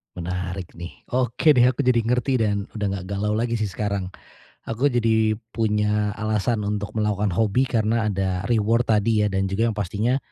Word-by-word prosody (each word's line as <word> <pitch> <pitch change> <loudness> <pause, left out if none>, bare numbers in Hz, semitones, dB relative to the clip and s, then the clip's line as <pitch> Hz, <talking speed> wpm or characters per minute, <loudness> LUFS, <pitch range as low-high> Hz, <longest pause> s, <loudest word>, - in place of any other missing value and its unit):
Menarik 90 +1 -4
nih. 85 +1 -9
Oke 125 +4 +3
deh 125 -4 +5
aku 130 +3 0
jadi 125 -2 +3
ngerti 125 +2 +1
dan 100 -2 0
udah 105 -2 -3
enggak 95 -2 -5
galau 105 +1 0
lagi 115 +2 -1
sih 110 - 0
sekarang, 100 -1 -3 0.6
aku 115 +5 0
jadi 110 -2 +2 0.2
punya 105 -1 +1
alasan 110 +1 -1
untuk 105 0 -3
melakukan 105 -2 0
hobi 110 +6 +2
karena 115 -2 +1
ada 95 -1 -1
reward 115 +1 +2
tadi 110 0 +2
ya - - +2
dan 95 0 0
juga 115 +4 +1
yang - - -4
pastinya, 105 +6 0
105 Hz, 175 wpm, -23 LUFS, 100-115 Hz, 0.6 s, deh